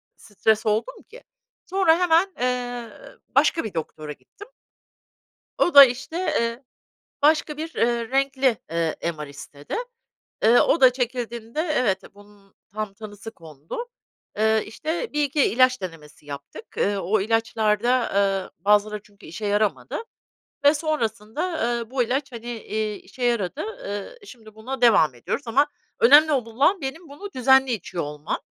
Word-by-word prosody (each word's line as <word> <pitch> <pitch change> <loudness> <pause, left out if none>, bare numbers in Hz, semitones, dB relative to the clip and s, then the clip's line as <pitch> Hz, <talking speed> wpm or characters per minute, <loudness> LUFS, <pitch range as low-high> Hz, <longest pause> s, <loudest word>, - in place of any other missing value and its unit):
stres 220 +1 0
oldum 220 - -1
ki - - -14 0.4
sonra 365 -3 +3
hemen, 355 +1 +3
eee, 245 -1 -2 0.5
başka 330 - +3
bir 215 - -6
doktora 155 -2 -5
gittim. 405 - -13 1.1
O 350 - +2
da 280 -1 +13
işte, 270 +5 -4
eee, 235 -9 -1 0.6
başka 300 0 +3
bir, 320 +1 -6
eee, 235 -1 0
renkli, 270 -1 +1 0.2
ııı, 165 -1 0 0.2
MR 150 - -5
istedi. 145 0 -9 0.7
Iıı, 230 +3 +6
o 330 - +2
da 255 -1 +7
çekildiğinde 240 0 -3
evet, 250 - 0
bunun 205 -1 -20 0.2
tam 215 -1 -4
tanısı 205 +1 -10
kondu. 160 - -8 0.5
Iıı, 220 0 +3
işte 315 - -4
1-2 295 -1 +2
ilaç 255 +2 +3
denemesi 155 -4 -9
yaptık. 140 -1 -9
Iıı, 200 0 +1
o 195 +4 +1
ilaçlarda, 225 +2 +1
ııı, 195 -1 +1
bazıları 210 +2 +2
çünkü 205 -2 -19
işe 170 +7 -7
yaramadı. 200 -11 0 0.7
Ve 285 - +7
sonrasında, 235 -6 -2 0.2
ııı, 235 -1 -1
bu 260 -2 +1
ilaç 265 +4 -2
hani, 235 -1 -9
eee, 215 -2 -3
işe 250 - -10
yaradı. 235 - 0
Iıı, 260 - -6
şimdi 220 - -14
buna 255 +5 -6
devam 180 - +5
ediyoruz. 235 - -4
Ama 275 +6 +3 0.3
önemli 295 +6 +7
ol 265 -6 +1
olan 275 - +1
benim 285 +5 -6
bunu 345 +9 -9
düzenli 265 +1 +4
içiyor 185 -5 -3
olmam. 150 +1 -4
230 Hz, 140 wpm, -24 LUFS, 205-275 Hz, 1.1 s, da